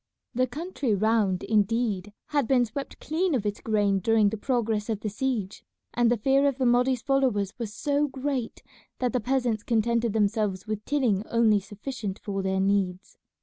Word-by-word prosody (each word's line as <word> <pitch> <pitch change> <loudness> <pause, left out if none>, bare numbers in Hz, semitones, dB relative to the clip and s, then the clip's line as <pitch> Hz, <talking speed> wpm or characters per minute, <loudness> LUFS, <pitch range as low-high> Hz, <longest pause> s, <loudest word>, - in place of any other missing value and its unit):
The 255 +1 +1
country 285 - -2
round, 210 -3 +1
indeed, 210 -2 0 0.2
had 285 -5 +1
been 250 -1 +4
swept 275 +5 -7
clean 330 +1 0
of 220 -5 -1
its 205 0 -2
grain 205 -3 +1
during 220 +1 +3
the 220 - -3
progress 225 -2 -1
of 215 -2 -2
the 215 - -2
siege, 215 -4 -3 0.3
and 240 -1 +3
the 240 - +2
fear 270 +5 +3
of 275 -2 0
the 260 - 0
Mahdi's 245 0 +2
followers 255 -8 +1
was 225 -3 -4
so 290 +5 0
great 265 -3 -4 0.3
that 250 -2 -1
the 250 - +2
peasants 245 -2 0
contented 230 0 +1
themselves 210 -3 0
with 215 -1 -4
tilling 245 -9 +1
only 225 -3 +3
sufficient 205 0 -6
for 195 -1 -4
their 190 0 0
needs. 195 -1 -1
225 Hz, 175 wpm, -26 LUFS, 205-255 Hz, 0.3 s, been